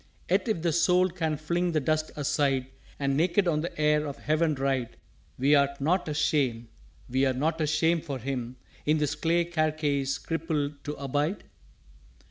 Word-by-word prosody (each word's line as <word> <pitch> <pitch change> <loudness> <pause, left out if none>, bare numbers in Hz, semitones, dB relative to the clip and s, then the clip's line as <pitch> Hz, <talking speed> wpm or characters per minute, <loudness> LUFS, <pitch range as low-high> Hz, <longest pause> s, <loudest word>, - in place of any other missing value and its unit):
"_Yet - - +2
if 210 -8 -1
the 170 - +2
Soul 180 +3 +3
can 160 -3 -1
fling 170 +3 -1
the 155 - +3
Dust 155 +2 0
aside 140 -2 +1 0.3
And 140 -1 0
naked 175 +5 +2
on 155 -3 +1
the 170 -1 -6
air 150 0 +2
of 140 - -6
Heaven 155 +1 +1
ride, 135 -3 -1 0.4
Wer't 140 +1 +3
not 170 +6 +1
a 150 - -2
shame 125 -7 0 0.4
wer't 130 0 +1
not 160 +4 0
a 155 - +1
shame 160 +2 +2
for 145 -4 -5
him 125 -1 -4 0.3
In 155 +1 +2
this 150 -2 0
clay 170 +1 +1
carcase 150 -4 0
crippled 150 -3 -3
to 150 - -3
abide? 145 +7 -2
150 Hz, 165 wpm, -28 LUFS, 140-165 Hz, 0.4 s, Soul